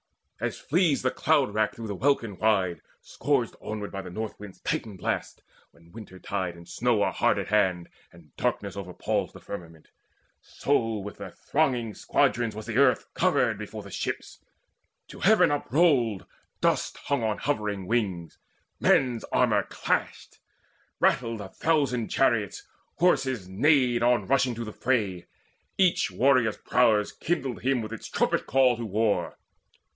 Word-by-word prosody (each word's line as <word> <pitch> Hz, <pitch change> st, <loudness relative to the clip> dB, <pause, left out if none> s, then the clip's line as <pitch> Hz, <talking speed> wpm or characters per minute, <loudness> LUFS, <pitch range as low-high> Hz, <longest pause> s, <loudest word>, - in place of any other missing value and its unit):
As -, -, -3 dB
flees 165 Hz, -4 st, +1 dB
the 130 Hz, -, +2 dB
cloud 140 Hz, -9 st, +2 dB
rack 110 Hz, 0 st, 0 dB
through 115 Hz, -, -7 dB
the 105 Hz, -, -4 dB
welkin 115 Hz, -2 st, 0 dB
wide 95 Hz, -5 st, +1 dB, 0.2 s
Scourged -, -, -1 dB
onward 105 Hz, -1 st, -5 dB
by 100 Hz, -, -5 dB
the 95 Hz, -, -9 dB
North 110 Hz, +4 st, -5 dB
wind's 105 Hz, -2 st, -11 dB
Titan 105 Hz, -4 st, -3 dB
blasts, -, -, -3 dB, 0.3 s
When 85 Hz, 0 st, -22 dB
winter 105 Hz, -3 st, -11 dB
tide 95 Hz, -2 st, -3 dB
and 85 Hz, 0 st, -14 dB
snow 120 Hz, -4 st, +1 dB
are -, -, +1 dB
hard -, -, +2 dB
at -, -, -3 dB
hand, 95 Hz, -5 st, +2 dB, 0.2 s
And 85 Hz, -3 st, -19 dB
darkness -, -, -2 dB
overpalls 90 Hz, -3 st, -3 dB
the -, -, -13 dB
firmament; 85 Hz, -5 st, -9 dB, 0.5 s
So 115 Hz, -6 st, 0 dB
with 105 Hz, 0 st, -7 dB
their -, -, -7 dB
thronging 125 Hz, -7 st, -1 dB
squadrons 115 Hz, +2 st, +1 dB
was 110 Hz, 0 st, -7 dB
the 115 Hz, +2 st, -1 dB
earth 135 Hz, -3 st, +3 dB
Covered -, -, +2 dB
before -, -, -7 dB
the -, -, -11 dB
ships. -, -, -5 dB, 0.7 s
To -, -, -11 dB
heaven 215 Hz, -4 st, +5 dB
uprolled, 140 Hz, -, +2 dB, 0.4 s
Dust -, -, +1 dB
hung 140 Hz, -3 st, -1 dB
on 110 Hz, -1 st, 0 dB
hovering 105 Hz, -9 st, -2 dB
wings' 95 Hz, -7 st, -2 dB, 0.4 s
men's 125 Hz, -4 st, +3 dB
armour -, -, +2 dB
clashed; -, -, -2 dB, 0.6 s
Rattled 115 Hz, -3 st, +1 dB
a 95 Hz, -, -8 dB
thousand 135 Hz, -7 st, 0 dB
chariots; 115 Hz, -7 st, +1 dB, 0.3 s
horses 135 Hz, -, +1 dB
neighed 125 Hz, +3 st, +3 dB
On 120 Hz, -3 st, +3 dB
rushing 130 Hz, -1 st, +2 dB
to 115 Hz, +1 st, -5 dB
the 110 Hz, -, -7 dB
fray. 100 Hz, -9 st, -1 dB, 0.5 s
Each 185 Hz, -3 st, +3 dB
warrior's 125 Hz, -5 st, +2 dB
prowess 110 Hz, -4 st, +2 dB
Kindled 135 Hz, -7 st, -3 dB
him 130 Hz, -2 st, +1 dB
with 110 Hz, +1 st, -6 dB
its 115 Hz, -, -8 dB
trumpet -, -, 0 dB
call 130 Hz, -2 st, +4 dB
to 115 Hz, -, -4 dB
war. 105 Hz, +1 st, 0 dB
115 Hz, 150 wpm, -27 LUFS, 100-130 Hz, 0.7 s, heaven